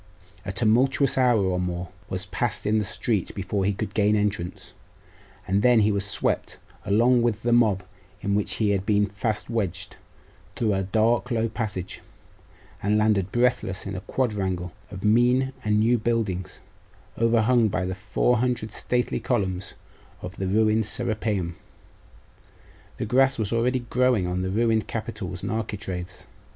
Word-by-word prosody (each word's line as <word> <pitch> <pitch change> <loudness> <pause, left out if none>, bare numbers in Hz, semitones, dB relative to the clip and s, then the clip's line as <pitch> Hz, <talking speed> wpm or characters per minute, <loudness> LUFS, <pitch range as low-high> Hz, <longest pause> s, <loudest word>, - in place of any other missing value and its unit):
A - - -1
tumultuous 125 +7 +3
hour, 125 -3 +4
or 95 -2 0
more, 90 -1 -3 0.2
was 90 0 -2
passed 115 +2 -1
in 110 +1 +2
the - - 0
street 105 0 -2
before 95 0 -2
he 100 - +2
could 110 +2 -4
gain 105 0 +3
entrance; 105 -4 -2 0.7
and 100 +2 +2
then 120 -1 +5
he 105 +1 +3
was 100 -1 0
swept, 100 +1 0 0.3
along 120 +5 +4
with 115 -2 0
the 120 0 +2
mob 105 -6 +3 0.4
in 100 - -1
which 105 0 +1
he 105 -2 +1
had 100 -2 0
been 105 0 +2
fast 105 +2 -2
wedged, 95 -6 -3 0.6
through 110 -3 +1
a 95 - 0
dark 110 +5 +1
low 115 -2 +1
passage, 105 -5 -4 0.8
and 105 +2 +2
landed 105 -3 +2
breathless 120 -6 0
in 100 0 -4
a 90 - -5
quadrangle 95 -8 -2 0.2
of 95 0 -8
mean 125 +5 +3
and 105 0 +2
new 115 +2 +3
buildings, 110 -5 -2 0.5
overhung 115 0 +3
by 95 -2 -1
the 95 - -2
four 100 +5 +1
hundred 120 -2 -1
stately 125 +3 -1
columns 95 -6 -2 0.5
of 90 +2 -6
the 95 - -2
ruined 110 +2 +2
Serapeium. 105 -6 -1 1.4
The - - -2
grass 135 +4 +3
was 110 -1 -1
already 125 +2 +1
growing 125 -6 +3
on 90 +1 -2
the 95 - -2
ruined 110 +2 +1
capitals 110 -6 -5
and - - -2
architraves.... 95 -5 -5
105 Hz, 155 wpm, -25 LUFS, 95-115 Hz, 1.4 s, then